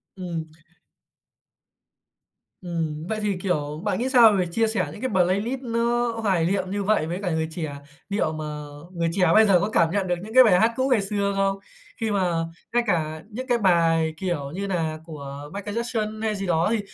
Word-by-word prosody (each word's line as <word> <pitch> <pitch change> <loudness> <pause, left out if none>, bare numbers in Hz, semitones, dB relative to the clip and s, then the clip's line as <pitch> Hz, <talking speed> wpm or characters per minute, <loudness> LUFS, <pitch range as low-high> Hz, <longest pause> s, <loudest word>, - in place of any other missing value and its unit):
Ừm. 175 -4 -4 2.2
Ừm, 165 -3 -3
vậy 220 - -1
thì, 205 -3 -1
kiểu, 150 -5 -2
bạn 210 +1 -1
nghĩ 255 +2 0
sao 240 -4 +7
về 185 -3 +1
chia 225 +5 +2
sẻ 210 -8 0
những 205 - -10
cái 260 - -1
playlist 200 +7 +1
nó 235 0 0
hoài 185 -6 +2
liệm 185 +1 -1
như 205 0 -1
vậy 200 -6 +1
với 175 +3 -3
cả 180 - -1
người 160 0 0
trẻ? 160 -3 -4 0.4
Liệu 200 -6 0
mà 155 0 -5 0.5
người 170 -1 0
trẻ 180 0 +3
bây 220 0 +7
giờ 190 -4 +5
có 205 - -1
cảm 165 -6 +2
nhận 195 0 0
được 175 - +1
những 220 - -9
cái 255 +1 +9
bài 185 -6 +5
hát 230 +2 +3
cũ 260 +2 +1
ngày 245 -5 +3
xưa 200 0 -1
không? 195 0 +1 0.4
Khi 220 -1 0
mà 185 -3 +1 0.4
ngay 240 - +3
cả 155 -4 -1
những 255 +5 -6
cái 245 - +3
bài 165 -5 +3
kiểu 160 -6 -3
như 195 +5 -4
nà 160 -4 -2
của 145 -2 -8
Michael 205 +2 -5
Jackson 220 -2 -2
hay 215 -1 0
gì 195 - -4
đó 165 0 +2
thì 230 - +1
195 Hz, 205 wpm, -24 LUFS, 165-220 Hz, 2.2 s, cái